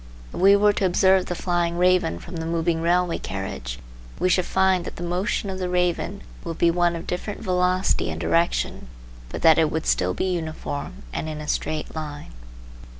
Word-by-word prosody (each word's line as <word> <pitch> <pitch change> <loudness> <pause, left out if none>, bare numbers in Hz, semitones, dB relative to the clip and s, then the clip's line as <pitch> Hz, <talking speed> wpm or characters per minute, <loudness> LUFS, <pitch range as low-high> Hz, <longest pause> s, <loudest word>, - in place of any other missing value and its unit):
If - - -5
we 195 +2 +7
were 205 0 +4
to 195 - 0
observe 190 +1 +3
the 175 - -3
flying 175 -1 0
raven 180 - +3
from 170 - -9
the 160 - -4
moving 165 0 0
railway 175 +1 +1
carriage. 90 -11 -5 0.4
we 185 - +1
should 180 0 +2
find 190 -2 +2
that - - -7
the 175 - -6
motion 180 +4 -1
of 190 - -5
the 180 -1 -2
raven 180 +2 -1 0.2
would 165 -1 -5
be 170 - +4
one 175 0 +2
of 165 - -6
different 200 +3 -4
velocity 185 0 +1
and - - -4
direction, 170 - 0 0.4
but - - -6
that 160 0 +7
it 160 -2 +3
would 160 +1 -3
still 90 0 +1
be - - -1
uniform 160 - -4
and 160 - -3
in 155 -1 -5
a 150 - -7
straight 155 0 -2
line. 150 - -6
175 Hz, 195 wpm, -24 LUFS, 160-185 Hz, 0.4 s, we